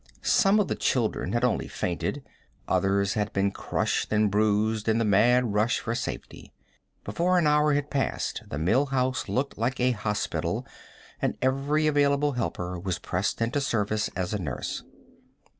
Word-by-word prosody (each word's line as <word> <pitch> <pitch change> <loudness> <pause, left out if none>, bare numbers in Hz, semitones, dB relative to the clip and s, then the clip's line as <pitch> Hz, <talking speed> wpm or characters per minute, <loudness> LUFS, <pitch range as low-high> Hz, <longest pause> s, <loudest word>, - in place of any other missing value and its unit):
Some 200 +1 +4
of 205 - +2
the - - -1
children 120 -4 0
had 120 +1 0
only 125 -3 +1
fainted; 90 +10 -3 0.4
others 100 +1 +1
had 105 -2 -1
been 100 0 +1
crushed - - -2
and 105 -1 +2
bruised 105 +1 +1
in 110 - +3
the 115 - +1
mad 115 +3 +3
rush 110 +4 +2
for 115 - -3
safety. - - -6 0.5
Before 180 +2 +1
an 175 - +3
hour 150 0 +4
had 145 0 -2
passed 140 -2 -1
the 70 - -4
Mill 105 - +2
House 130 -1 -1
looked 135 -1 -2
like 125 +3 -1
a 125 +1 +3
hospital, 105 -2 -2 0.6
and - - -1
every 140 +4 +1
available 145 -1 +3
helper 90 -8 -3
was 90 -1 -2
pressed 95 +5 -2
into 125 +5 0
service 110 -5 0
as 90 +2 -2
a 105 - -1
nurse. 70 -7 -4
115 Hz, 160 wpm, -27 LUFS, 105-140 Hz, 0.6 s, Some